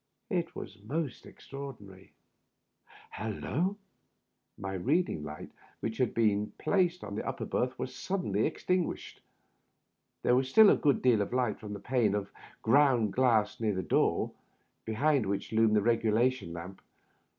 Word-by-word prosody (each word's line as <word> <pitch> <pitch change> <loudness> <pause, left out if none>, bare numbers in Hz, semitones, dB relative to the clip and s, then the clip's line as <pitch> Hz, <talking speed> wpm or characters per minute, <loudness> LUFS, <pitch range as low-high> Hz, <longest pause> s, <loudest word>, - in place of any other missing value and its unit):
It 175 -3 0
is 100 +1 -8
most 140 +5 -4
extraordinary 105 -9 -10 0.5
— - - -20
^hallo!" 145 - -2 0.8
My 95 -1 -5
reading 130 - 0
lantern, 75 +1 -8 0.3
which 110 0 -4
had 125 -3 +1
been 105 -2 +1
placed 180 -3 +1
in 100 - -6
the 105 - -3
upper - - -3
berth, 125 +1 -1
was 130 - -4
suddenly 185 +6 -1
extinguished. 180 -2 -2 1.0
There 125 - +4
was 130 +1 +1
still 215 +8 +8
a - - +5
good 145 -3 +1
deal 120 -5 +4
of 100 - -3
light 125 -4 0
from 105 -1 -7
the 100 - -6
pane 110 -1 +1
of 100 -1 -3 0.3
ground 125 -3 +4
glass 115 -5 +2
near 110 -3 0
the 95 - -2
door, - - +1 0.5
behind 130 +1 +1
which 100 +3 -3
loomed 110 -1 +4
the 105 - +3
regulation 115 -1 +1
lamp. 85 +3 -8
115 Hz, 150 wpm, -30 LUFS, 105-135 Hz, 1.0 s, still